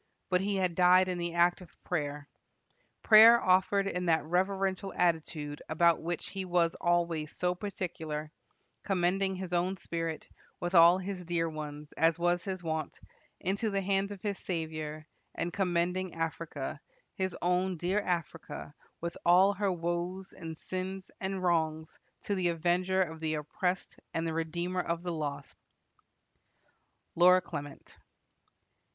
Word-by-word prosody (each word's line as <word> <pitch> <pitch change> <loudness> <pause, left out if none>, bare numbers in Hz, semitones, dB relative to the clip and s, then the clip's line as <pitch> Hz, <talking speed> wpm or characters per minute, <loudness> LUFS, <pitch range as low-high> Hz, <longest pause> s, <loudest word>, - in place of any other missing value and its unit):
But 180 0 +3
he 200 +1 0
had 185 -2 +1
died 180 +1 +5
in 180 -1 -2
the 170 0 -3
act 175 +1 +3
of 180 - -15
prayer 145 -3 -3 0.8
prayer 225 +2 +9
offered 190 +1 +3
in 180 -2 -2
that 160 -1 +3
reverential 190 +2 0
attitude 160 -4 -1
about 170 +1 +3
which 170 0 -4
he 195 -1 -4
was 175 -2 +2
always 170 -3 +1
so 180 0 0
particular; 165 -6 -5 0.5
commending 190 0 +1
his 185 -1 -6
own 180 +2 +1
spirit, 165 -3 -4 0.3
with 175 +1 -3
all 170 +1 +8
his 190 -1 -5
dear 170 -1 0
ones, 150 -1 -7
as 165 +1 +3
was 175 0 +1
his 185 -2 -4
wont, 160 -2 -3 0.4
into 200 +4 0
the 195 -1 -1
hands 195 +1 +1
of 200 -2 -9
his 205 -2 -2
Saviour; 155 -3 -4 0.3
and 170 +1 -2
commending 180 -1 0
Africa, 160 -3 -4 0.3
his 190 -2 -2
own 180 +1 +1
dear 180 +5 0
Africa, 170 -5 -4 0.3
with 170 0 -4
all 185 +3 +6
her 200 0 0
woes 175 +2 -3
and 160 -1 -8
sins 185 +2 -5
and 190 -1 -3
wrongs, 160 -2 0 0.2
to 205 - -1
the 185 -3 +1
Avenger 180 +3 +1
of 160 -2 -7
the 155 -1 -1
oppressed 180 +5 -3 0.2
and 165 0 0
the 165 - -2
Redeemer 170 +3 -2
of 170 0 -3
the 175 -1 -2
lost." 145 -3 -5 1.6
LORA 180 +2 +6
CLEMENT. 145 -4 -8
175 Hz, 145 wpm, -31 LUFS, 165-185 Hz, 1.6 s, prayer